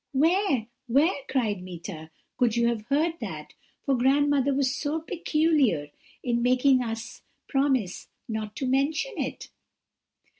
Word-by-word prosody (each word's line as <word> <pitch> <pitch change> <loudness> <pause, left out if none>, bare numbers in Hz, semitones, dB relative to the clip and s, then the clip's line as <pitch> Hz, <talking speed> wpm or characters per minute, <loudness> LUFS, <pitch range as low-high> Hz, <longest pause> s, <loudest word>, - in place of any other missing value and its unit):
"'Where 315 - +2 0.2
where,' 280 +6 +3
cried 220 -8 0
Meeta, 170 -3 -8 0.3
'could 240 -3 +2
you 235 0 +3
have 220 -2 -3
heard 320 +4 +1
that? - - -6 0.3
for 275 - +2
grandmother 280 +2 +3
was 270 -1 +1
so 295 +2 -1
very 325 +2 -6
particular 295 - +2 0.3
in 235 -1 0
making 255 +2 +4
us 230 +1 -5 0.3
promise 270 -9 0 0.2
not 220 -1 -4
to 270 - -3
mention 280 - +1
it.' - - -4
260 Hz, 135 wpm, -27 LUFS, 225-290 Hz, 0.3 s, making